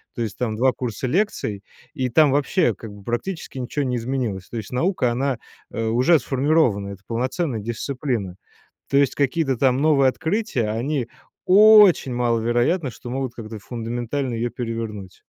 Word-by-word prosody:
То 120 Hz, -, -4 dB
есть 105 Hz, -, -5 dB
там 110 Hz, -3 st, -2 dB
2 130 Hz, +1 st, +3 dB
курса 125 Hz, 0 st, -4 dB
лекций, 125 Hz, -, -1 dB, 0.3 s
и 130 Hz, -1 st, -2 dB
там 145 Hz, +3 st, +4 dB
вообще 145 Hz, +5 st, +2 dB
как 110 Hz, -3 st, -10 dB
бы 100 Hz, -1 st, -13 dB
практически 135 Hz, +6 st, -4 dB
ничего 130 Hz, +3 st, -2 dB
не 125 Hz, -1 st, -1 dB
изменилось. 115 Hz, -6 st, -3 dB
То 120 Hz, -, -6 dB
есть 110 Hz, 0 st, -6 dB
наука, 130 Hz, -2 st, +1 dB
она, 135 Hz, 0 st, -1 dB, 0.3 s
э, 115 Hz, -, -3 dB
уже 125 Hz, +9 st, +4 dB
сформирована. 130 Hz, -6 st, +1 dB
Это 100 Hz, 0 st, -10 dB
полноценная 125 Hz, +2 st, -2 dB
дисциплина. 120 Hz, -3 st, -3 dB, 0.5 s
То 140 Hz, -, +2 dB
есть, 140 Hz, -1 st, +3 dB
какие-то 140 Hz, -1 st, +1 dB
там 130 Hz, 0 st, +3 dB
новые 140 Hz, -4 st, +4 dB
открытия, 160 Hz, -, -1 dB
они 125 Hz, +3 st, -2 dB, 0.4 s
очень 205 Hz, -, +7 dB
маловероятно, 120 Hz, +5 st, +1 dB
что 120 Hz, -, -10 dB
могут 130 Hz, -2 st, -3 dB
как-то 110 Hz, -2 st, -8 dB
фундаментально 120 Hz, +4 st, -4 dB
её 120 Hz, +1 st, -1 dB
перевернуть. 115 Hz, -5 st, -6 dB
125 Hz, 155 wpm, -22 LUFS, 115-140 Hz, 0.5 s, очень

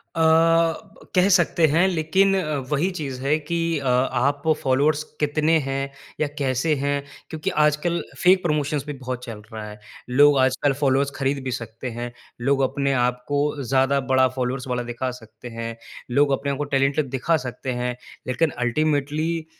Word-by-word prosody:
अ, -, -, -2 dB, 1.0 s
कह 180 Hz, +1 st, +5 dB
सकते 175 Hz, -3 st, +4 dB
हैं। 165 Hz, +5 st, +3 dB
लेकिन 190 Hz, +3 st, +2 dB
अ, 155 Hz, -5 st, -1 dB, 0.2 s
वही 150 Hz, +6 st, +1 dB
चीज़ 135 Hz, -4 st, -5 dB
है 140 Hz, +3 st, +2 dB
की 155 Hz, +3 st, -3 dB, 0.2 s
अ, 140 Hz, -, -7 dB
आप 130 Hz, +2 st, +1 dB, 0.2 s
फ़ॉलोअर्स 145 Hz, +3 st, +2 dB, 0.2 s
कितने 155 Hz, +2 st, +2 dB
हैं 135 Hz, 0 st, -2 dB, 0.3 s
या 155 Hz, -, +1 dB
कैसे 135 Hz, +2 st, +1 dB
हैं? 140 Hz, 0 st, -1 dB, 0.3 s
क्योंकि 160 Hz, -2 st, -3 dB, 0.2 s
आजकल 150 Hz, +3 st, 0 dB, 0.2 s
फ़ेक 185 Hz, +1 st, +6 dB
प्रमोशन्स 150 Hz, -3 st, 0 dB
भी 150 Hz, -, -5 dB
बहुत 130 Hz, -2 st, -6 dB
चल 115 Hz, -4 st, -8 dB
रहा 110 Hz, -1 st, -6 dB
है। 105 Hz, 0 st, -11 dB, 0.3 s
लोग 145 Hz, +3 st, +5 dB
आजकल 130 Hz, +2 st, +2 dB
फ़ॉलोअर्स 140 Hz, 0 st, +2 dB
खरीद 135 Hz, 0 st, -1 dB
भी 130 Hz, -, -3 dB
सकते 115 Hz, +1 st, -5 dB
हैं। 120 Hz, 0 st, -4 dB, 0.3 s
लोग 135 Hz, +2 st, +2 dB
अपने 140 Hz, -1 st, 0 dB
आप 125 Hz, 0 st, -1 dB
को 145 Hz, 0 st, +1 dB, 0.2 s
ज़्यादा 135 Hz, +3 st, +2 dB
बड़ा 130 Hz, 0 st, +5 dB
फ़ॉलोअर्स 125 Hz, +1 st, -2 dB
वाला 125 Hz, -1 st, -1 dB
दिखा 120 Hz, +2 st, -3 dB
सकते 110 Hz, +2 st, -13 dB
हैं। 115 Hz, 0 st, -4 dB, 0.4 s
लोग 140 Hz, +3 st, +3 dB
अपने 140 Hz, 0 st, -2 dB
आप 140 Hz, -, -3 dB
को 145 Hz, -, -1 dB
टैलेंटेड 140 Hz, +1 st, +1 dB
दिखा 135 Hz, +6 st, +1 dB
सकते 130 Hz, +1 st, -5 dB
हैं। 125 Hz, 0 st, -2 dB, 0.3 s
लेकिन 140 Hz, +6 st, +1 dB, 0.2 s
अल्टीमेटली 155 Hz, +4 st, 0 dB
140 Hz, 170 wpm, -23 LUFS, 130-155 Hz, 1.0 s, फ़ेक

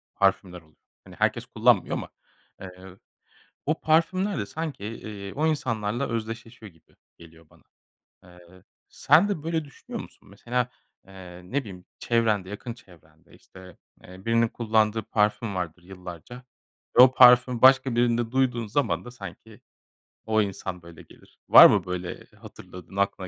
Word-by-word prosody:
parfümler 95 Hz, -2 st, 0 dB
oluyor. 80 Hz, -1 st, -28 dB, 0.3 s
Hani, -, -, -15 dB
herkes -, -, -1 dB
kullanmıyor -, -, +2 dB
ama, -, -, -7 dB, 0.5 s
eee, 95 Hz, 0 st, -12 dB, 0.7 s
o 155 Hz, +3 st, -1 dB
parfümler 185 Hz, +5 st, +1 dB
de 100 Hz, -, -3 dB
sanki, 155 Hz, -5 st, -6 dB
eee, 105 Hz, -2 st, -8 dB
o 155 Hz, +3 st, 0 dB
insanlarla 120 Hz, -5 st, -2 dB
özdeşleşiyor 115 Hz, -1 st, -7 dB
gibi 80 Hz, -1 st, -29 dB, 0.2 s
geliyor 85 Hz, -1 st, -17 dB
bana. -, -, -24 dB, 0.6 s
Eee, 90 Hz, 0 st, -18 dB, 0.3 s
sen 155 Hz, +9 st, +3 dB
de 195 Hz, -8 st, -3 dB
böyle 160 Hz, 0 st, -2 dB
düşünüyor 140 Hz, -, -9 dB
musun? -, -, -17 dB
Mesela, 120 Hz, +4 st, -3 dB, 0.4 s
eee, 95 Hz, -2 st, -12 dB
ne 130 Hz, +10 st, -2 dB
bileyim 95 Hz, -8 st, -11 dB
çevrende, 110 Hz, -5 st, 0 dB
yakın 115 Hz, +3 st, -7 dB
çevrende, 85 Hz, -8 st, -22 dB
işte, 95 Hz, -1 st, -16 dB, 0.3 s
eee, 95 Hz, +1 st, -14 dB
birinin 115 Hz, 0 st, +2 dB
kullandığı 110 Hz, -1 st, 0 dB
parfüm 105 Hz, 0 st, -1 dB
vardır 90 Hz, -1 st, -5 dB
yıllarca 90 Hz, +6 st, -11 dB, 0.5 s
ve -, -, +11 dB
o 130 Hz, 0 st, +7 dB
parfümü 125 Hz, -1 st, +6 dB
başka 130 Hz, -1 st, +5 dB
birinde 120 Hz, -1 st, +1 dB
duyduğun 125 Hz, -3 st, 0 dB
zaman 135 Hz, +7 st, -1 dB
da 125 Hz, -, -9 dB
sanki 100 Hz, -7 st, -12 dB, 0.7 s
o 110 Hz, 0 st, +2 dB
insan, 95 Hz, -2 st, -5 dB
böyle, 85 Hz, -1 st, -14 dB
gelir. -, -, -21 dB
Var -, -, +11 dB
mı -, -, +4 dB
böyle 90 Hz, -1 st, -6 dB
hatırladığın 90 Hz, +1 st, -13 dB
aklına 100 Hz, -1 st, -1 dB
110 Hz, 145 wpm, -25 LUFS, 90-125 Hz, 0.7 s, ve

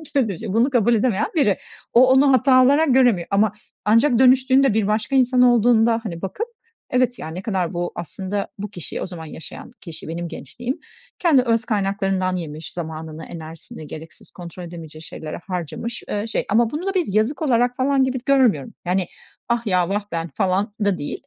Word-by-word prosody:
övülünce 225 Hz, -, 0 dB
de 190 Hz, -, -3 dB
bunu 235 Hz, +5 st, +3 dB
kabul 240 Hz, -3 st, +3 dB
edemeyen 215 Hz, -2 st, +1 dB
biri. 240 Hz, -, +3 dB, 0.4 s
O 250 Hz, +2 st, +7 dB
onu 270 Hz, +1 st, +5 dB
hata 255 Hz, 0 st, +5 dB
olarak 285 Hz, +1 st, +4 dB
göremiyor 245 Hz, -10 st, +3 dB
ama 205 Hz, +1 st, +3 dB, 0.3 s
ancak 230 Hz, +4 st, +4 dB
dönüştüğünde, 260 Hz, 0 st, +5 dB
bir 215 Hz, -2 st, +1 dB
başka 215 Hz, +5 st, 0 dB
insan 255 Hz, -1 st, +4 dB
olduğunda, 235 Hz, -1 st, +4 dB
hani, 170 Hz, -7 st, -6 dB
bakıp, 405 Hz, -, -4 dB, 0.4 s
evet, 250 Hz, -1 st, +1 dB
ya, -, -, -6 dB
ne 165 Hz, +3 st, -6 dB
kadar, 190 Hz, -5 st, -2 dB
bu 175 Hz, 0 st, -2 dB
aslında 195 Hz, +4 st, -4 dB
bu 205 Hz, +1 st, -5 dB
kişi, 180 Hz, -4 st, -7 dB
o -, -, -2 dB
zaman 175 Hz, -3 st, -8 dB
yaşayan 160 Hz, +9 st, -10 dB
kişi 165 Hz, -3 st, -9 dB
benim 170 Hz, +2 st, -4 dB
gençliğim, 245 Hz, +9 st, -6 dB, 0.4 s
kendi 315 Hz, -7 st, +4 dB
öz 230 Hz, -1 st, 0 dB
kaynaklarından 195 Hz, -3 st, 0 dB
yemiş, 155 Hz, -3 st, -6 dB
zamanını, 160 Hz, -1 st, -6 dB
enerjisini 160 Hz, -2 st, -10 dB
gereksiz 160 Hz, +2 st, -11 dB
kontrol 175 Hz, 0 st, -9 dB
edemeyeceği 165 Hz, -2 st, -9 dB
şeylere 155 Hz, -1 st, -7 dB
harcamış, 180 Hz, +5 st, -5 dB
eee, 210 Hz, +1 st, -2 dB
şey. 225 Hz, -, -2 dB
Ama 225 Hz, +2 st, +3 dB
bunu 315 Hz, +5 st, -4 dB
da 390 Hz, -, 0 dB
bir 365 Hz, -3 st, 0 dB
yazık 220 Hz, +7 st, +1 dB
olarak, 245 Hz, -4 st, +2 dB
falan, 270 Hz, +1 st, +2 dB
gibi 260 Hz, 0 st, -1 dB
görmüyorum. 250 Hz, -, +2 dB
Yani, 180 Hz, +1 st, +1 dB, 0.4 s
ah, 235 Hz, -1 st, 0 dB
ya, 180 Hz, -2 st, +2 dB
vah, 205 Hz, +1 st, -1 dB
ben 165 Hz, 0 st, -3 dB
falan 195 Hz, +1 st, 0 dB
da 200 Hz, -3 st, +2 dB
değil 145 Hz, -, -5 dB
210 Hz, 180 wpm, -21 LUFS, 175-250 Hz, 0.4 s, O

